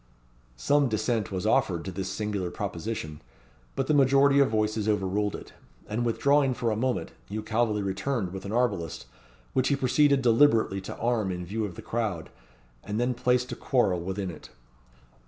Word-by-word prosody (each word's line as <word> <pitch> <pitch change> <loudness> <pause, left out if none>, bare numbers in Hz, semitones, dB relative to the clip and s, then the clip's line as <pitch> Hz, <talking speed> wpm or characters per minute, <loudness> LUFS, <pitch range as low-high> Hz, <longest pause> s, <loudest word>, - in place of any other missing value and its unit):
Some 145 - +2
dissent 110 -1 -1
was 95 +1 -3
offered 90 -6 +1
to 95 - -4
this 95 +1 -4
singular 105 -4 -2
proposition, 85 -5 -5 0.5
but 135 - 0
the 155 - +1
majority 140 0 +5
of 140 - +4
voices 110 0 0
overruled 105 0 0
it; - - -10 0.3
and 110 +3 -2
withdrawing 135 +3 +2
for 120 -2 -1
a - - 0
moment, 125 +3 -1 0.2
Hugh 105 +1 -4
Calveley 110 -2 0
returned 95 0 -2
with 95 0 -6
an 100 - -6
arbalist, 100 - -1 0.5
which 130 0 +2
he 140 - +3
proceeded 140 +1 +3
deliberately 115 -5 +4
to 95 - -8
arm 115 -4 0
in 90 -1 -5
view 110 +4 -2
of 95 -4 -7
the - - -9
crowd, 105 -8 -3 0.5
and 105 +2 -3
then 125 +1 +1
placed 125 +1 +1
a - - -3
quarrel 110 -10 +1
within 95 +1 -3
it. 80 - -12
110 Hz, 175 wpm, -27 LUFS, 95-125 Hz, 0.5 s, majority